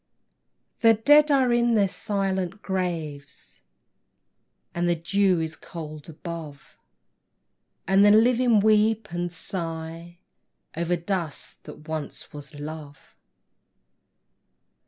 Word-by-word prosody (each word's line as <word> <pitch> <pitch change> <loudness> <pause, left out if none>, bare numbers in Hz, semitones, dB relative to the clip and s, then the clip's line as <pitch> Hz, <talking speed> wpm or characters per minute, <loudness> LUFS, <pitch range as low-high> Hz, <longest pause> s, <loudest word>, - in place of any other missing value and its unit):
The 225 -1 +5
dead 295 +7 +5
are 265 -4 +3
in 240 -1 +3
their 200 -2 +3
silent 195 0 -3
graves, 165 -7 -5 1.1
And 175 0 0
the 175 - +2
dew 185 +2 +1
is 160 0 -3
cold 155 -3 -9
above, 155 -2 -9 1.1
And 195 +2 +4
the 205 - +7
living 230 +1 +4
weep 215 0 +2
and 175 0 -3
sigh, 165 -1 -5 0.6
Over 170 +2 0
dust 170 -3 -4
that 150 - -12
once 155 -2 -6
was 145 +1 -10
love. 145 -1 -9
175 Hz, 100 wpm, -25 LUFS, 160-210 Hz, 1.1 s, the